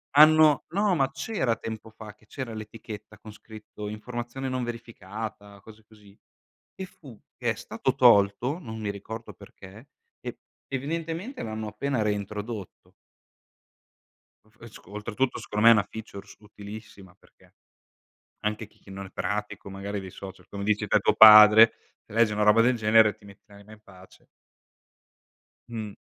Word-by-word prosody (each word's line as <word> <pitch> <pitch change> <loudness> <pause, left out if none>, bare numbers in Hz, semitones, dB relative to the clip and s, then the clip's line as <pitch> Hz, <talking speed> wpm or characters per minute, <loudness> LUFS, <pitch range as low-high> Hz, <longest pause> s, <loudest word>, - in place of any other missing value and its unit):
hanno 155 -1 +6
no 200 +2 +1
ma 135 -4 +1
c'era 135 - -2
tempo 110 0 -7
fa 110 -1 -12
che 110 - -27
c'era 130 -3 -6
l'etichetta 110 -1 -10
con 110 -1 -12
scritto 105 -1 -10
"informazione 120 +4 -6
non 130 -1 -2
verificata", 110 -3 -8
cose 110 +1 -16
così; 105 -2 -20 0.6
che 190 - -6
fu 135 - -15 0.2
che 120 -2 0
è - - -4
stato 115 +4 -3
tolto, 120 - +4
non 110 -10 -8
mi 105 -2 -3
ricordo 110 +3 -8
perché, 100 +7 -15 0.3
e - - -7 0.3
evidentemente 165 - -4
l'hanno 110 0 -5
appena 125 +3 -2
reintrodotto. 105 0 -5 1.6
F 110 +2 -29
e 115 - -10
sc 110 - -16
oltretutto 105 +5 -3
secondo 105 +1 -2
me 115 - +10
è - - +7
una 105 - +2
features 100 -2 -10
utilissima, 105 -2 -12
perché - - -26 0.9
anche 105 0 -3
chi 100 - -18
non 95 0 -7
è - - -11
pratico 105 -1 -4
magari 100 +1 -5
dei 95 -1 -9
social, 95 -1 -11
come 100 0 -7
dici 105 +1 0
te - - +3
tuo - - +2
padre, 110 +1 +9 0.3
se - - -15
legge 115 -1 +3
una 105 0 0
roba 105 +2 +5
del 125 +2 +3
genere, 110 -2 +4
ti 110 - -21
metti 100 -1 -16
l'anima 100 +1 -16
in 110 - -14
pace. 95 -3 -18 1.4
Mh. 110 -3 -6
110 Hz, 155 wpm, -26 LUFS, 105-120 Hz, 1.6 s, me